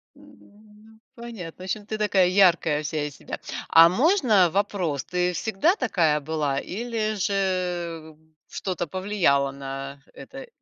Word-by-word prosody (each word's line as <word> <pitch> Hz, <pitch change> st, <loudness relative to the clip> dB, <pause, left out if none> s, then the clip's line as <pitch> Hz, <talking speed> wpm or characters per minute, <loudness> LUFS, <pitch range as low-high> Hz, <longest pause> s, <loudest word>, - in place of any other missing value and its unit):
М, -, -, -18 dB, 0.5 s
ну, 220 Hz, 0 st, -20 dB, 0.2 s
понятно. 210 Hz, -8 st, -9 dB
В -, -, -7 dB
общем, 205 Hz, +2 st, -4 dB
ты 215 Hz, 0 st, -4 dB
такая, 195 Hz, -4 st, +3 dB
яркая 175 Hz, -5 st, +3 dB
вся 150 Hz, 0 st, -2 dB
из 145 Hz, -2 st, -7 dB
себя. -, -, -8 dB, 0.3 s
А 165 Hz, +1 st, +8 dB
можно 235 Hz, -, +3 dB
вопрос, 180 Hz, -7 st, -1 dB
ты 180 Hz, 0 st, -1 dB
всегда 220 Hz, -, +1 dB
такая 165 Hz, -, +1 dB
была, 145 Hz, -2 st, -2 dB
или 215 Hz, +1 st, -3 dB
же 180 Hz, -5 st, -2 dB, 0.3 s
что-то 180 Hz, -3 st, -4 dB
повлияло 180 Hz, -8 st, +1 dB
на 135 Hz, 0 st, -7 dB
это -, -, -11 dB
180 Hz, 135 wpm, -24 LUFS, 155-210 Hz, 0.5 s, А